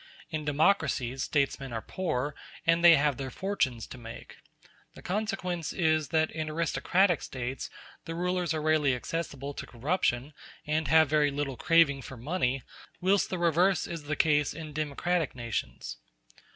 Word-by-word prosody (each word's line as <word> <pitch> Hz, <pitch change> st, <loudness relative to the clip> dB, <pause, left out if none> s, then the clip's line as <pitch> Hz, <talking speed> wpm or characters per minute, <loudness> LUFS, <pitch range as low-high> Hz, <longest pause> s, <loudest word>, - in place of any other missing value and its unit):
In 155 Hz, -2 st, -3 dB
democracies 145 Hz, -5 st, +1 dB
statesmen 140 Hz, -3 st, 0 dB
are 115 Hz, -1 st, -4 dB
poor, 150 Hz, -6 st, -2 dB, 0.3 s
and 165 Hz, +1 st, +3 dB
they 170 Hz, -1 st, +10 dB
have 145 Hz, -2 st, +2 dB
their 135 Hz, -1 st, -4 dB
fortunes 130 Hz, -, -1 dB
to 130 Hz, -, -10 dB
make. 115 Hz, -1 st, -10 dB, 0.6 s
The -, -, -12 dB
consequence 185 Hz, -4 st, -2 dB
is 155 Hz, -4 st, +2 dB
that 160 Hz, +2 st, +1 dB
in 155 Hz, -1 st, -3 dB
aristocratic 170 Hz, +2 st, +2 dB
States 130 Hz, +1 st, -5 dB, 0.4 s
the 165 Hz, -, -5 dB
rulers 180 Hz, 0 st, 0 dB
are 155 Hz, -2 st, -1 dB
rarely 155 Hz, -4 st, +3 dB
accessible 145 Hz, 0 st, -4 dB
to -, -, -7 dB
corruption, 135 Hz, +1 st, -1 dB, 0.3 s
and 155 Hz, 0 st, 0 dB
have 160 Hz, +2 st, +6 dB
very 150 Hz, 0 st, +3 dB
little 140 Hz, -1 st, -3 dB
craving 165 Hz, -3 st, +4 dB
for 130 Hz, +1 st, -9 dB
money; 135 Hz, -1 st, -1 dB, 0.4 s
whilst 190 Hz, +2 st, +2 dB
the 185 Hz, -, -2 dB
reverse 175 Hz, +2 st, +3 dB
is 165 Hz, -3 st, -6 dB
the 155 Hz, +1 st, -1 dB
case 150 Hz, -2 st, +2 dB
in 155 Hz, -2 st, -7 dB
democratic 155 Hz, +2 st, -1 dB
nations. 115 Hz, -, -4 dB
155 Hz, 150 wpm, -29 LUFS, 135-170 Hz, 0.6 s, they